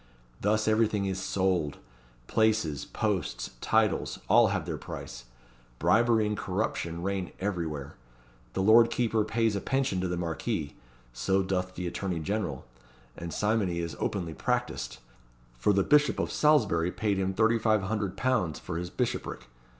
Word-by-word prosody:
Thus 110 +2 +1
everything 110 -2 +2
is 95 -1 -2
sold; 95 -5 0 0.5
places, 110 - +1
posts, - - -2
titles, - - +1
all 115 +3 +6
have 95 -5 -1
their 80 -4 -4
price - - -8 0.5
bribery 115 - +3
and 105 0 -1
corruption 90 -4 -2
reign 95 -2 -2
everywhere. 80 -8 -3 0.6
The 95 - 0
lord 115 +3 +7
keeper 115 -2 +1
pays 110 0 +1
a 100 - -2
pension 135 -9 0
to 95 - 0
the 90 0 -2
Marquis 85 -1 -3 0.4
so 95 +11 +1
doth 90 -1 -2
the 90 - -4
attorney 90 0 -2
general 80 -5 -3 0.5
and 85 0 -6
simony 105 -4 0
is 85 -3 -3
openly 85 -5 -2
practised; - - -2 0.6
for 105 - +3
the 100 -1 +3
Bishop 150 +4 +4
of - - -1
Salisbury 105 - +3
paid 100 -2 0
him 95 0 -1
£3,500 110 -3 +1
for 80 - -5
his 90 +1 -4
bishopric. - - -3
95 Hz, 140 wpm, -29 LUFS, 85-110 Hz, 0.6 s, lord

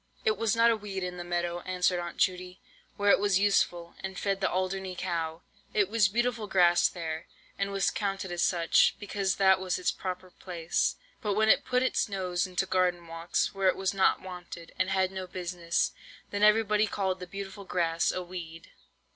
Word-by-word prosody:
"It 440 -1 +3
was 225 -2 0
not 230 +1 +5
a - - +2
weed 200 -3 -5
in 180 0 -4
the 175 - -5
meadow," 175 0 -2
answered 180 0 0
Aunt 175 -1 -6
Judy, 180 0 0 0.4
"where 205 0 +4
it - - +5
was 200 -2 +3
useful, 175 -4 +1
and 190 -1 -6
fed 195 -1 -1
the - - +2
Alderney 185 0 -2
cow. 165 -2 -3 0.3
It 205 -3 +3
was 220 -2 +4
beautiful 235 +1 -1
Grass 175 -3 +4
there, 160 -2 -5 0.3
and 195 0 0
was 195 -1 +1
counted 195 -3 -3
as 175 0 -2
such, 170 -2 +3
because 200 -2 -1
that 190 -1 +4
was 185 -1 -1
its 180 - 0
proper 185 -1 -6
place. 175 -2 -1 0.3
But 205 -2 -1
when 220 +1 +3
it - - +5
put 250 0 +1
its 260 - +1
nose 185 -2 -1
into 185 +1 -1
garden 180 -2 +1
walks, 165 +1 -1
where 195 -1 +1
it 185 - +4
was 190 0 0
not 190 -1 +3
wanted, 180 -2 -9
and 185 0 +2
had 190 -1 +1
no 190 -1 -5
business, 175 -2 -1 0.4
then 205 - -2
everybody 210 0 +4
called 190 -2 -1
the 180 - -7
beautiful 200 +2 -7
Grass 170 -3 0
a 185 - -3
weed." 170 -2 -9
185 Hz, 195 wpm, -29 LUFS, 175-200 Hz, 0.4 s, not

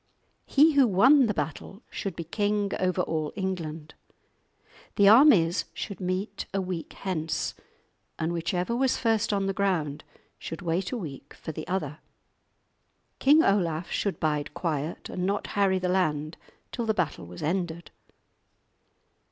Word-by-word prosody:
He 305 +3 +5
who 275 -3 +5
won 255 +7 +5
the 210 - 0
battle 195 - -5
should 195 -4 -4
be 170 - -4
king 205 +3 -1
over 185 0 +1
all 155 -3 -2
England. 165 -6 -4 1.0
The 200 -2 +5
armies 205 - +6
should 200 - -6
meet 185 +3 -3
a - - +2
week 180 -3 -4
hence, 165 -5 -2 0.6
and 165 +2 -1
whichever 175 +6 -1
was 260 +1 +2
first 225 -2 +1
on 200 -1 0
the 195 - 0
ground 175 -8 -1 0.4
should 165 - -7
wait 175 +2 -1
a 250 - -2
week 150 - -8
for - - -7
the 155 0 -7
other. 155 -5 -3 1.2
King 300 +4 +6
Olaf 170 -5 +1
should 200 - -1
bide 150 -2 -1
quiet, 155 -2 -3
and 180 - -4
not 200 +1 -1
harry 195 -2 +3
the 185 0 -1
land 155 -4 0 0.4
till 235 -2 -3
the 220 - +1
battle 155 - -2
was 90 0 -9
ended. 170 0 -2
185 Hz, 145 wpm, -27 LUFS, 160-205 Hz, 1.2 s, armies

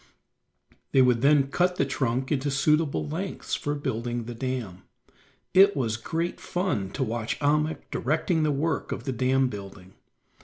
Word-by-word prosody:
They 130 - +6
would 125 -2 +3
then 140 0 +4
cut 180 +2 +2
the 140 - +1
trunk 130 -1 -1
into 145 -1 0
suitable 150 +2 +1
lengths 180 +6 -5
for 145 0 -1
building 120 -4 -3
the 120 +2 -6
dam. 115 -7 -4 0.7
It 195 +2 +6
was 115 -5 0
great 165 +9 -3
fun 175 - -2
to 135 - -1
watch 115 -1 -2
Ahmuk 150 +1 +1
directing 160 +4 0
the 155 -1 +2
work 145 +2 -1
of - - -4
the 135 - -2
dam 130 +2 +2
building. 100 -4 -9
135 Hz, 155 wpm, -26 LUFS, 120-155 Hz, 0.7 s, They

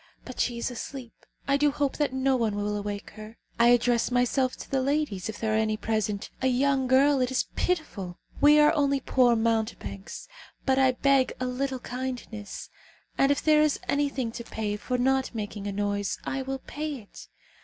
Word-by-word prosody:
But 255 - -9
she 240 -1 0
is 235 - -2
asleep. 245 0 -7 0.3
I 275 0 +3
do 295 +1 +3
hope 285 -1 -1
that 295 -3 +1
no 265 0 +1
one 225 -4 0
will 205 0 -1
awake 205 0 -5
her. 215 +1 -10 0.2
I 235 - +6
address 240 -1 +3
myself 250 +1 +1
to - - -10
the 270 -1 +1
ladies, 270 -8 -1
if 220 - -6
there 220 -1 0
are - - +3
any 215 -1 +1
present. 215 -2 -2
A 260 - +2
young 265 +1 +2
girl, 270 +2 +4
it 250 - +1
is 260 - 0
pitiful! 210 - -2 0.2
We 295 +1 +7
are 300 0 +6
only 280 -3 +2
poor 250 -3 +3
mountebanks, 225 -3 -2 0.4
but 265 -1 +3
I 260 -1 +4
beg 275 0 +2
a 255 - -1
little 260 +1 -2
kindness, 245 -4 -6 0.4
and 275 +1 +3
if 285 - 0
there 305 -1 +5
is 305 -2 +2
anything 280 -4 0
to 235 - -7
pay 215 -2 -3
for 250 +4 -2
not 265 0 +1
making 205 -1 -5
a - - -2
noise, 205 0 -1
I 270 - -2
will 265 0 -5
pay 300 0 -4
it. 220 -6 -12
250 Hz, 195 wpm, -27 LUFS, 220-275 Hz, 0.4 s, We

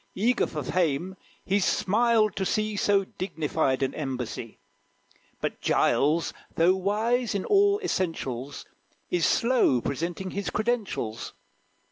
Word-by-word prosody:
Eager 240 +5 +2
for 150 -2 -5
fame, 175 +4 0 0.3
he 200 +2 +2
smiled 215 +2 +2
to 195 - -1
see 215 +2 0
So 200 0 +3
dignified 155 -7 -1
an 135 - -1
embassy. 125 -6 -5 0.8
But - - -4
Giles, 155 +4 +2 0.2
though 175 +3 +4
wise 215 +5 0
in 195 - -2
all 405 0 +4
essentials, 145 - -3 0.5
Is 175 -2 +2
slow 235 - +3
presenting 170 +8 -3
his 200 0 -3
credentials. 210 - -2
185 Hz, 115 wpm, -27 LUFS, 150-215 Hz, 0.8 s, though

